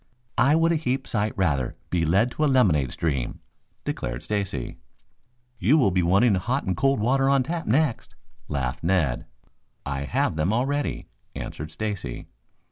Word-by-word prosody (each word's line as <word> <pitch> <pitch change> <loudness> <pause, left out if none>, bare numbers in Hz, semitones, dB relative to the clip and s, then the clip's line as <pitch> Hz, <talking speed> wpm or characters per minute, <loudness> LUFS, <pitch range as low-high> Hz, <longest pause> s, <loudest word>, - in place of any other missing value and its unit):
"I 140 +5 +5
would 165 +1 +3
a 165 - +2
heap 130 -3 -1
sight 105 -1 0
rather 70 -10 0 0.2
be 85 -2 +1
led 100 +10 +3
to 155 - -2
a - - +4
lemonade 85 - +3
stream," 70 -7 -2 0.5
declared - - -3
Stacy. 95 - -3 0.8
"You 120 - +4
will 110 -10 +4
be 90 0 +2
wanting 100 +7 +4
hot 120 +9 0
and 95 - -1
cold 135 0 +2
water 135 +5 +2
on 140 -1 +4
tap 165 +5 -4
next," 135 +1 +1 0.3
laughed 65 -3 -3
Ned. 80 -9 +1 0.6
"I 70 0 -3
have 70 - 0
them 80 +5 +1
already," 140 +5 -1 0.3
answered 75 +1 -6
Stacy. 105 0 -4
105 Hz, 155 wpm, -25 LUFS, -, 0.8 s, I